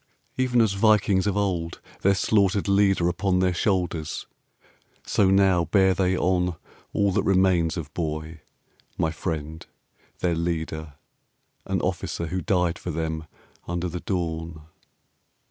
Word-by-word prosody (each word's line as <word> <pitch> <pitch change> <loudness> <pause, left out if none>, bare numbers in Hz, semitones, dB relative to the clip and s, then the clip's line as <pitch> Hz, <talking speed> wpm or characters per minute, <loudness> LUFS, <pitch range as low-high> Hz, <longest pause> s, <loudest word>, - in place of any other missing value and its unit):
Even 125 -2 +2
as 110 -3 +2
Vikings 100 -1 +3
of 100 0 0
old 90 -5 -1 0.2
their 100 +1 +4
slaughtered 100 0 +2
leader 100 -3 +3
Upon 90 +2 +1
their 90 0 +2
shoulders, 90 -4 -1 0.8
so 95 - +3
now 95 -3 +4
bear 95 +2 +3
they 95 0 +1
on 90 -1 +1 0.4
All 100 -1 +2
that - - +1
remains 95 -3 +2
of 75 -3 -6
Boy, 80 -1 -4 0.6
my 80 - +1
friend, 80 -1 -4 0.5
their 90 -2 0
leader, 80 -2 -3 0.7
An - - 0
officer 85 - -2
who 90 +3 -3
died 90 -4 0
for - - -6
them 80 -1 -3 0.4
under 85 +1 -2
the 90 +1 -5
dawn. 80 -4 -3
90 Hz, 130 wpm, -25 LUFS, 80-95 Hz, 0.8 s, their